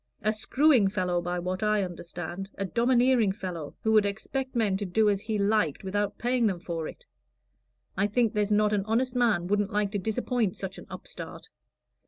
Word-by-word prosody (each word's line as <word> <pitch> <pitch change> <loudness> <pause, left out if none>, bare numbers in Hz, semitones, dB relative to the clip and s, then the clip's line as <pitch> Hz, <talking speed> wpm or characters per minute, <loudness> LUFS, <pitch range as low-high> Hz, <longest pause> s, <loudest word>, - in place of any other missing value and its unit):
"A 215 +1 +2
screwing 255 +1 +3
fellow, 180 -3 0
by 175 +1 -2
what 185 +2 -3
I 210 -1 +2
understand 175 +1 -6
a 195 - -2
domineering 240 0 +3
fellow 180 -7 -6
who 220 - +2
would 215 -1 +6
expect 260 +6 -3
men 215 -5 +2
to 205 - -3
do 215 +4 +2
as 200 -1 -1
he 220 0 -2
liked 200 -7 +1
without 200 +1 -1
paying 245 -1 +1
them 185 -4 -1
for 170 -2 -4
it. - - -11 0.9
I 200 - +2
think 225 +1 +1
there's 210 -1 0
not 210 0 +3
an 200 -2 +1
honest 240 +4 0
man 225 -8 +2
wouldn't 205 +1 +1
like 210 -2 0
to 205 - -1
disappoint 220 0 -1
such 190 0 -6
an - - -13
upstart." - - -8
205 Hz, 190 wpm, -28 LUFS, 190-225 Hz, 0.9 s, would